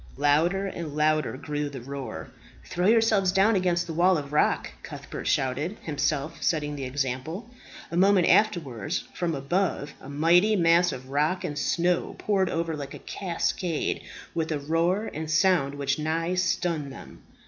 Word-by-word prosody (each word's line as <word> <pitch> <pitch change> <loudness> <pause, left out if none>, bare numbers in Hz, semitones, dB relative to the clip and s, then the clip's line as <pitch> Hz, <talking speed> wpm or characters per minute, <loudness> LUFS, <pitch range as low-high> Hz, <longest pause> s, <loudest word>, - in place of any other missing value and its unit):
Louder 160 +7 +2
and 170 -6 -5
louder 155 -2 +1
grew 150 +1 -3
the 140 -2 -7
roar. 125 -9 -7 0.3
"Throw 180 +2 -1
yourselves 220 -4 +4
down 195 +4 +4
against 175 -2 +1
the 165 - -5
wall 180 +2 +4
of 145 -1 -6
rock," 150 - +2
Cuthbert - - -7
shouted, 140 +9 0
himself 145 0 -2
setting 150 -3 0
the 135 -2 -4
example. 140 - -3 0.4
A 170 - -2
moment 190 -1 +5
afterwards, 155 - +1
from 170 -3 -1
above, 145 +1 -1
a 135 - -10
mighty 175 +9 +4
mass 170 -1 +4
of 130 -1 -8
rock 155 +7 +1
and 150 -5 -3
snow 175 +4 0
poured 195 -3 +1
over 165 -1 -1
like 140 -2 -7
a - - -13
cascade, 175 -2 -2 0.3
with 160 -1 -2
a 155 - 0
roar 165 +8 0
and 155 +1 -5
sound 165 -4 +3
which 140 0 -1
nigh 165 +3 -1
stunned 170 -5 0
them. - - -12
160 Hz, 160 wpm, -26 LUFS, 145-180 Hz, 0.4 s, moment